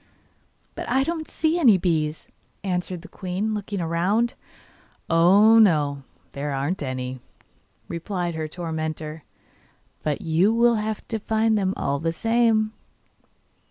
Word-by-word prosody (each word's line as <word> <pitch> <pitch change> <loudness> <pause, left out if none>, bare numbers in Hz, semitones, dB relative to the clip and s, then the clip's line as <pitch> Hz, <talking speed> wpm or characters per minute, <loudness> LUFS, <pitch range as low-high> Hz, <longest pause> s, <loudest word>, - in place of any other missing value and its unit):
'But - - -6
I 265 +2 +3
don't 320 +1 -3
see 320 +2 0
any 235 - +6
bees,' 160 -4 -1 0.4
answered 180 -2 -3
the - - -10
queen, 190 +3 -3
looking 205 -2 -3
round. 190 +9 +1 0.8
'Oh, 200 +7 +6
no, 150 -9 +3 0.3
there 140 +1 -4
aren't 145 +7 -2
any,' 130 -1 -4 0.7
replied 175 0 -3
her 160 -1 -3
tormentor; 160 -1 -5 0.8
'but 150 -2 -2
you 165 +6 +2
will 235 0 +4
have 215 0 -3
to 225 - -2
find 220 +1 +1
them 195 -2 0
all 140 0 -1
the 165 +2 -1
same. 225 +1 +2
180 Hz, 125 wpm, -24 LUFS, 160-220 Hz, 0.8 s, any